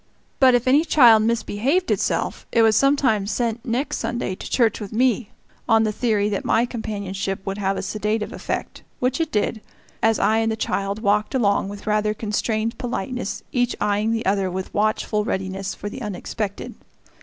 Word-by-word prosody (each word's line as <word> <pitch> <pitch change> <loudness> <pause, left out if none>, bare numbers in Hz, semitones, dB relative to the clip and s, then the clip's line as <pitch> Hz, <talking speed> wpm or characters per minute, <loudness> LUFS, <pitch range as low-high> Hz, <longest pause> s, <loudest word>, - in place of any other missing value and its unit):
But 255 -2 +6
if 245 +1 0
any 285 +4 +5
child 240 -9 +6
misbehaved 235 - 0
itself, - - -1
it 230 - +4
was 220 -1 +4
sometimes 260 -7 +2
sent 230 -1 -1
next 250 +5 -2
Sunday 240 -5 -2
to - - -8
church 230 -4 +2
with 205 -3 -7
me, 240 -1 +1 0.4
on 225 -1 +5
the 215 - +1
theory 215 -2 +1
that 200 - -2
my 230 +2 +2
companionship 200 -4 -4
would 195 +1 -3
have 195 -1 0
a - - -3
sedative 210 +2 -2
effect - - -4 0.2
which 255 +5 0
it 320 - -2
did, 215 +1 -1 0.4
as 225 0 +3
I 220 - +2
and 225 0 +1
the - - -1
child 200 -1 -2
walked 210 +4 +1
along 200 -5 +2
with 205 0 -9
rather 210 0 +1
constrained 220 +1 -2
politeness, 245 -1 -4
each 245 -1 +1
eying 210 +2 +1
the 225 0 -1
other 195 -1 +1
with 185 +1 -5
watchful 210 0 0
readiness 190 -1 -3
for 205 - -6
the 255 +6 -7
unexpected. 205 0 -4
215 Hz, 180 wpm, -22 LUFS, 205-240 Hz, 0.4 s, But